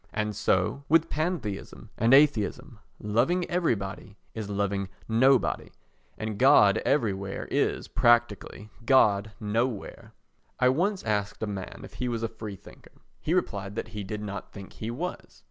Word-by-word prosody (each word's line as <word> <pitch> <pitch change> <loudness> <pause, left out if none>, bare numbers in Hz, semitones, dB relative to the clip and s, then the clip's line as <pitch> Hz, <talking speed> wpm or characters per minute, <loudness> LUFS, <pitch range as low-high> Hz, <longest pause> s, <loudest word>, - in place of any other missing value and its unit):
And 105 -1 -2
so 100 +5 +1
with 165 +1 +4
pantheism 120 - -3
and 115 +2 +2
atheism; 135 -6 +3 0.2
loving 125 +13 +1
everybody 105 - -2 0.2
is 110 -2 -5
loving 100 -1 -1 0.2
nobody, 125 +3 +3 0.5
and 110 -2 -4
God 125 -7 +6
everywhere 100 -7 -1
is, - - 0
practically, 120 -3 +1
God 110 -5 +3
nowhere. 110 +1 -3 0.5
I 125 0 +5
once 185 +9 0
asked 105 -1 -2
a - - +1
man 100 -3 -6
if - - -11
he 125 - 0
was 115 -1 -3
a - - +1
free 110 -2 -8
thinker; - - -16 0.3
he 165 - 0
replied 100 - -2
that - - -4
he 105 -1 -6
did 105 +2 -5
not 100 0 -6
think 100 -2 -11
he 110 - -6
was. 165 +10 -6
110 Hz, 145 wpm, -27 LUFS, 100-130 Hz, 0.5 s, God